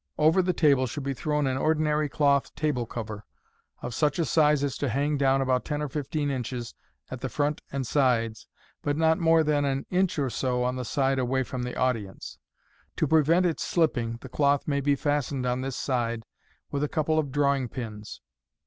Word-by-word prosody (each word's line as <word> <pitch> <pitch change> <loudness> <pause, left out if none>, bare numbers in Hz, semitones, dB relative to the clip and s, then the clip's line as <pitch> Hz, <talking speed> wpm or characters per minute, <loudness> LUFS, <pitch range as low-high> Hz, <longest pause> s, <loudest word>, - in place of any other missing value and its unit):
Over 160 +5 +4
the 180 0 +1
table 140 -7 +3
should 135 +5 -5
be 135 0 -2
thrown 150 +2 -1
an 130 -1 0
ordinary 155 -1 +1
cloth 140 -1 +1
table 140 -6 -1
cover, 110 -3 -6 0.6
of 120 - -4
such 150 +2 +1
a 165 - +1
size 150 0 +3
as 140 -2 -1
to 140 - 0
hang 140 +5 0
down 135 -1 +2
about 130 -1 +1
ten 150 -1 -3
or 150 -1 -3
fifteen 145 +1 -2
inches 125 -2 -4 0.4
at 130 -1 -6
the 130 - -3
front 145 +3 -1
and 135 -1 -2
sides, 115 -5 +1 0.3
but 145 0 -1
not 160 0 +3
more 165 -1 +4
than 150 -1 +1
an 135 -1 -1
inch 180 -2 +1
or 135 -4 0
so 125 +2 -1
on 125 +1 0
the 125 -1 -4
side 135 +1 +1
away 130 +1 +1
from 130 0 -5
the 125 0 -4
audience. 115 -7 -2 0.6
To - - +1
prevent 160 +4 +4
its 170 -3 0
slipping, 120 -9 0
the - - -9
cloth 140 -1 +1
may 140 -2 0
be 140 +1 +2
fastened 145 -2 -1
on 125 +1 0
this 135 -1 -3
side 115 -3 -1 0.5
with 140 0 -1
a 150 - 0
couple 155 -1 +1
of 145 -3 -2
drawing 140 -3 +1
pins. 110 -4 -7
140 Hz, 200 wpm, -27 LUFS, 125-150 Hz, 0.6 s, Over